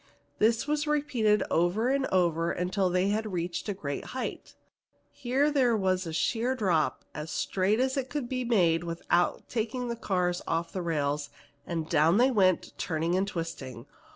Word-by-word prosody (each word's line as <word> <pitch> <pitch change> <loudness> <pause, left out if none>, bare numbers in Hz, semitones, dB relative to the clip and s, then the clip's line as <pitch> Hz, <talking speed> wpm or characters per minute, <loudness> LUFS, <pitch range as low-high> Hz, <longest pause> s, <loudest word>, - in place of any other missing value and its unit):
This 225 +1 +3
was 300 0 -1
repeated 270 -8 +2
over 180 +8 +2
and 275 0 +1
over 170 -2 +1
until 185 +1 0
they 180 +2 +1
had 215 +1 -1
reached 175 +3 -3
a - - 0
great 140 -7 -4
height. - - -5 0.6
Here 270 +3 +1
there 250 -6 +3
was 185 -2 0
a - - -4
sheer 235 +9 0
drop 180 -10 0
as 150 +1 -6
straight 195 +6 0
as 260 0 +1
it 265 -1 -2
could 275 -1 -3
be 255 0 -2
made 175 -9 +2
without 175 +1 0
taking 245 +2 -2
the 235 - -2
cars 180 -5 -1
off 165 +1 -1
the 185 - -2
rails, 150 -3 -1 0.4
and 165 -2 -3
down 160 +3 +4
they 255 +3 +4
went, 185 -6 +2
turning 165 0 -1
and 190 +2 +1
twisting. 155 - -6
190 Hz, 170 wpm, -28 LUFS, 170-240 Hz, 0.6 s, down